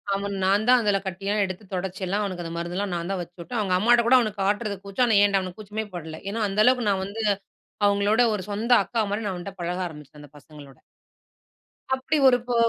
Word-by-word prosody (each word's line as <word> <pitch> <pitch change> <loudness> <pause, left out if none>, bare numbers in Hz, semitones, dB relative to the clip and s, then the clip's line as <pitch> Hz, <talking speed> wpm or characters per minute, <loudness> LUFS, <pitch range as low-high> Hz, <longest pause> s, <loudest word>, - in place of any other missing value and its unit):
அவன் 200 0 -3
நான்தான் 215 +6 +4
அதில 205 -2 +2
கட்டியலாம் 200 +3 -1
எடுத்து 185 +2 -7
தொடச்சி 185 +1 -4
எல்லாம் 200 +3 -1
அவனுக்கு 185 -3 -4
அந்த 165 0 -6
மருந்தெல்லாம் 175 +3 -3
நான் 170 +2 -4
தான் 190 -2 -2
வச்சுவுட்டேன். 175 +7 -6
அவங்க 195 -3 0
அம்மாகிட்ட 235 +4 +4
கூட 260 +2 +7
அவனுக்கு 215 -4 -2
காட்டுறது 205 +1 0
கூச்சம். 200 +6 +1
ஆனா 220 -3 +4
ஏன்ட்ட 200 -1 +3
அவனுக்கு 185 +2 -7
கூச்சமே 215 +1 -5
படல. 160 -2 -7
ஏன்னா 225 +3 -3
அந்த 200 +2 +1
அளவுக்கு 250 -3 +3
நான் 190 -1 0
வந்து 215 +3 -5 0.6
அவங்களோட 205 +3 +2
ஒரு 185 - -5
சொந்த 220 +4 -2
அக்கா 230 - -1
மாரி 210 +2 -2
நான் 185 -3 -3
வந்து 195 +3 -7
அவன்ட்ட 195 - -24
பழக 180 +2 -2
ஆரம்பிச்சேன். 150 -2 -13
அந்த 145 - -13
பசங்களோட. 145 -2 -14 1.2
அப்படி 265 +4 -1
ஒரு 245 - +4
போ 245 - 0
200 Hz, 210 wpm, -25 LUFS, 180-215 Hz, 1.2 s, கூட